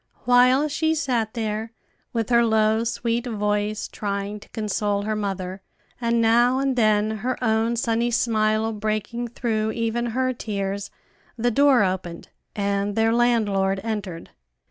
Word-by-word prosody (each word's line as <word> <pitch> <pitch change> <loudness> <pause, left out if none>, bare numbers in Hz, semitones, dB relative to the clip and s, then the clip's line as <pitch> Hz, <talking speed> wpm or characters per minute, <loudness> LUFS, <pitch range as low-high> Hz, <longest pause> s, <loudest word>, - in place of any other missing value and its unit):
While 255 +4 +5
she 315 +2 0
sat 245 -7 -1
there, 220 0 -3 0.4
with 230 -1 -2
her 235 0 +5
low, 220 0 +2
sweet 235 +1 -1
voice, 210 -1 -1
trying 200 0 -4
to - - -17
console 205 -1 -1
her 215 +1 -1
mother, 195 -2 -4 0.4
and 235 0 +1
now 240 +3 +4
and 270 -1 0
then 215 -2 +2
her 250 +4 -2
own 225 +1 +1
sunny 235 0 0
smile 220 -1 +1
breaking 215 +3 -3
through 220 -2 -2
even 230 +1 -1
her 255 +2 0
tears, 200 -3 -4 0.5
the 240 +1 +1
door 275 -1 +5
opened, 185 -3 -3 0.3
and 200 0 -1
their 225 0 +2
landlord 205 -5 +2
entered. 205 -7 -5
220 Hz, 140 wpm, -23 LUFS, 210-240 Hz, 0.5 s, While